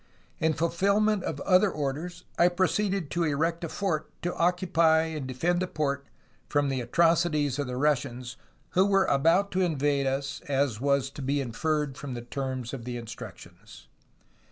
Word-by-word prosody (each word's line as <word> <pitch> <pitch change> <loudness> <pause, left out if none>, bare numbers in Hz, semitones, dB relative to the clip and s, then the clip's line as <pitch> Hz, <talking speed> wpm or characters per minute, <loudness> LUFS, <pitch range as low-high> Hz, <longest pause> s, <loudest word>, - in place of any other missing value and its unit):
In 160 0 +2
fulfilment 200 +5 +1
of 145 - -3
other 185 +2 +4
orders, 160 +4 -4
I 175 - +5
proceeded 190 -1 0
to 170 - 0
erect 165 +3 0
a 165 - -3
fort 170 -5 -2
to 175 - -1
occupy 170 -2 +3
and 155 -4 -4
defend 175 +8 0
the 185 - 0
port 140 -4 -2 0.4
from 145 -1 +1
the 130 -2 -1
atrocities 155 0 +2
of 140 - -1
the 125 0 -4
Russians, 130 -3 0 0.4
who 190 +2 +4
were 195 -1 +4
about 165 +8 +3
to 190 - 0
invade 145 -5 +1
us, 140 +2 -2
as 135 -5 0
was 140 -1 +1
to 145 - -8
be 140 +2 0
inferred 145 +3 -1
from 135 -3 -5
the 120 - -5
terms 130 -1 -4
of 130 -4 -5
the 120 0 -4
instructions. 115 -1 -11
150 Hz, 165 wpm, -28 LUFS, 135-175 Hz, 0.4 s, I